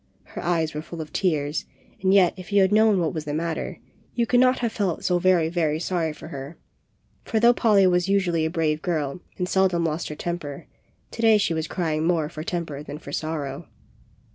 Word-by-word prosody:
Her - - -8
eyes 165 -2 0
were 150 - -4
full 170 +1 -9
of 155 -1 -7
tears, 150 -5 0 0.4
and 190 0 +2
yet, 190 -3 +5
if 185 +2 -11
you 200 -1 +5
had 190 - +2
known 215 -1 +5
what 165 -3 0
was 155 -1 -4
the 145 0 -3
matter, 165 0 -3 0.4
you 235 - +2
could 245 +1 +3
not 255 0 +4
have 235 -2 -1
felt 195 -7 -2
so 180 -1 +2
very, 180 -3 +3
very 160 -2 0
sorry 170 -2 -1
for 150 - -10
her; 140 +3 -8 0.7
for 225 - 0
though 235 +2 +6
Polly 210 -5 +4
was 180 0 +2
usually 180 -5 +2
a 160 - +1
brave 155 -2 0
girl 155 -2 -2 0.2
and 180 - -1
seldom 185 -3 +2
lost 160 +1 -2
her 150 - -5
temper, 165 -4 -5 0.5
to 230 - -6
day 225 -1 +6
she 200 -5 +1
was 160 0 -2
crying 160 -4 -1
more 165 -4 +1
for 155 -2 -7
temper 165 -5 -4
than 145 0 -7
for 145 -2 -10
sorrow. 150 -3 -4
170 Hz, 215 wpm, -24 LUFS, 155-190 Hz, 0.7 s, though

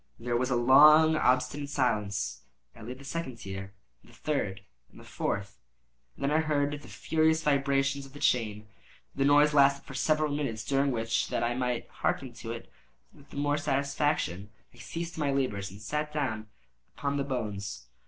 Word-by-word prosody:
There 120 +1 -2
was 125 +2 +1
then 125 - +2
a - - +1
long 150 +5 +8
and 160 - +1
obstinate 130 +1 +1
silence. 105 - -1 0.3
I 115 - -13
laid 125 +3 -7
the 140 - -13
second 150 -3 -4
tier, 95 -2 -7 0.3
and - - -20
the - - -18
third, 100 -11 -2 0.3
and - - -16
the - - -13
fourth; 100 0 -4 0.6
and - - -8
then 140 - +1
I 155 - +3
heard 145 -2 +1
the 145 0 -7
furious 160 0 +1
vibrations 140 -1 +1
of 135 - -19
the 145 - -10
chain. 110 -5 +1 0.5
The 135 - 0
noise 145 +1 +5
lasted 140 -1 +4
for - - -10
several 155 +2 +1
minutes, 115 -7 -3
during 140 0 +2
which, 115 -2 0
that - - -1
I 120 +1 +1
might 125 -1 -2
hearken 130 -3 -2
to 115 -1 -7
it 115 0 -8 0.4
with 140 - -19
the - - -10
more 145 +1 +1
satisfaction, 140 - -1 0.2
I - - -20
ceased 165 0 -6
my 145 -2 +1
labors 115 -8 -1
and 100 +2 -12
sat 150 +8 -3
down 120 -8 -2 0.5
upon 140 0 -1
the 140 - 0
bones. 105 -7 -4
135 Hz, 190 wpm, -29 LUFS, 115-145 Hz, 0.6 s, long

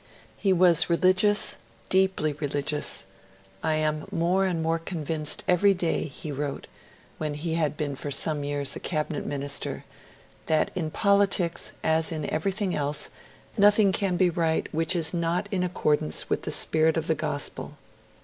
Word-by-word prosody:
He 195 - 0
was 180 -2 +4
religious, 185 +4 +3 0.3
deeply 190 -5 +2
religious. 145 0 -2 0.6
'I 160 -1 +1
am 155 -1 -1
more 180 +3 +1
and 170 -3 -1
more 165 +1 +1
convinced 160 -3 -2
every 195 +3 +4
day,' 175 -2 -1
he 150 +2 -8
wrote, 145 0 -4 0.5
when 150 -1 -2
he 160 +2 -3
had 155 -3 0
been 145 -2 -2
for 145 - -5
some 145 +1 -1
years 145 -1 -3
a - - -5
Cabinet 155 -2 -3
Minister, 140 0 -3 0.6
'that 155 -1 +2
in 165 -4 -2
politics, 200 -2 +1
as 160 +1 +1
in 155 -3 -3
everything 190 +3 -1
else, 145 0 -3 0.5
nothing 205 0 +5
can 190 -2 0
be 180 -1 +3
right 165 -2 0
which 165 +3 +1
is 165 -1 -1
not 170 +3 -1
in 190 -3 0
accordance 150 - 0
with - - +1
the - - -4
spirit 160 +1 +3
of 160 - -1
the 160 - +2
Gospel.' 150 -1 -3
160 Hz, 155 wpm, -26 LUFS, 150-180 Hz, 0.6 s, nothing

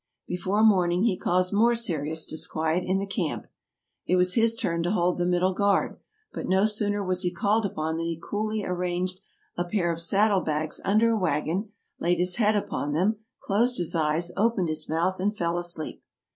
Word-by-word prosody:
Before 190 +4 0
morning 180 -4 +4
he 225 -5 +2
caused 180 +1 0
more 230 +3 +4
serious 160 -8 -2
disquiet 160 +2 -1
in 185 +1 0
the 195 - -2
camp. 195 -5 -3 0.6
It 180 - +3
was 180 0 +3
his 230 +1 +3
turn 170 -6 -1
to 175 - -1
hold 180 -2 +1
the 175 - +1
middle 180 +1 +2
guard; 200 +1 +1 0.3
but - - -5
no 190 +2 +3
sooner 205 -1 0
was 185 0 0
he 180 - +1
called 200 +5 +1
up - - -12
than 160 +1 -2
he 165 -1 -3
coolly 215 +3 -3
arranged 180 +1 -2 0.4
a 175 - +1
pair 175 -1 0
of 165 0 -3
saddle 200 +3 +3
bags 155 -1 -2
under 215 +4 +3
a 225 - +1
wagon, 175 +4 -1 0.3
laid 175 +1 +1
his 180 +3 0
head 215 -2 +3
upon 145 -7 -2
them, 195 +8 +1 0.3
closed 235 +5 +1
his 175 -2 -1
eyes, 160 +2 0
opened 200 -4 +1
his 155 0 -4
mouth, 170 +4 0
and 205 +3 -1
fell 170 0 0
asleep. 175 -2 -3
180 Hz, 190 wpm, -26 LUFS, 170-205 Hz, 0.6 s, morning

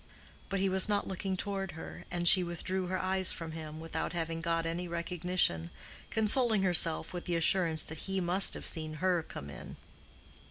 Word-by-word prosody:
But 195 -1 -2
he 195 - +1
was 190 +1 +3
not 205 -1 0
looking 190 0 -4
toward 195 -2 -4
her, 160 - -10
and 175 -1 -1
she 185 +1 +10
withdrew 180 +2 -3
her 185 +1 -2
eyes 185 0 +3
from 165 -1 -6
him, 155 -1 -8
without 165 +2 -4
having 165 -1 -3
got 165 0 -1
any 170 +2 -3
recognition, 170 - 0 0.4
consoling 220 -1 +2
herself 175 -3 +4
with 175 - -6
the 175 - -2
assurance 165 -1 +1
that 160 0 -8
he 190 0 -1
must 185 +2 +2
have - - -7
seen 155 -2 -2
her 180 +1 0
come 70 - -9
in. - - -10
175 Hz, 185 wpm, -31 LUFS, 165-190 Hz, 0.4 s, she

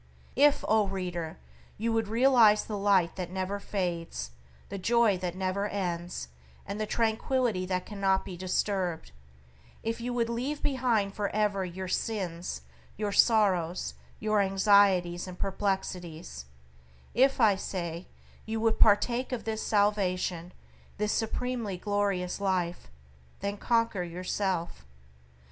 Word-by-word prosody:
If, 290 +1 +4
O 215 -2 +3
reader! 180 -4 -4 0.4
you 225 +2 0
would 225 -1 +1
realize 230 -2 +5
the 215 - -4
Light 195 -4 +2
that 180 -2 -4
never 190 +2 -3
fades, 170 - -3 0.4
the 200 - -5
Joy 230 +1 +3
that 180 -1 -3
never 190 +2 -1
ends, 175 - -3 0.4
and 200 +2 -4
the 215 - -1
tranquillity 225 -3 0
that 180 -1 -1
cannot 195 -2 0
be 185 - -7
disturbed; 185 - -1 0.7
if 225 +1 -2
you 245 +1 -2
would 240 -1 0
leave 255 +6 -3
behind 240 -8 +1
for 205 -1 -2
ever 205 -2 +1
your 185 +1 -5
sins, 180 - -3 0.3
your 210 0 -1
sorrows, 190 -6 +3 0.3
your 215 -1 +2
anxieties 190 -3 +3
and 180 -1 -8
perplexities; 180 - -3 0.7
if, 265 +2 +3
I 215 -4 +5
say, 175 -2 -4 0.4
you 220 0 -2
would 220 0 +1
partake 235 +5 +4
of 245 -3 -3
this 220 -1 -3
salvation, 185 -4 0 0.5
this 210 +1 0
supremely 230 -3 -2
glorious 200 -1 -1
Life, 180 -3 -1 0.5
then 200 0 -2
conquer 230 -4 +1
yourself. 180 0 -2
200 Hz, 125 wpm, -29 LUFS, 180-220 Hz, 0.7 s, realize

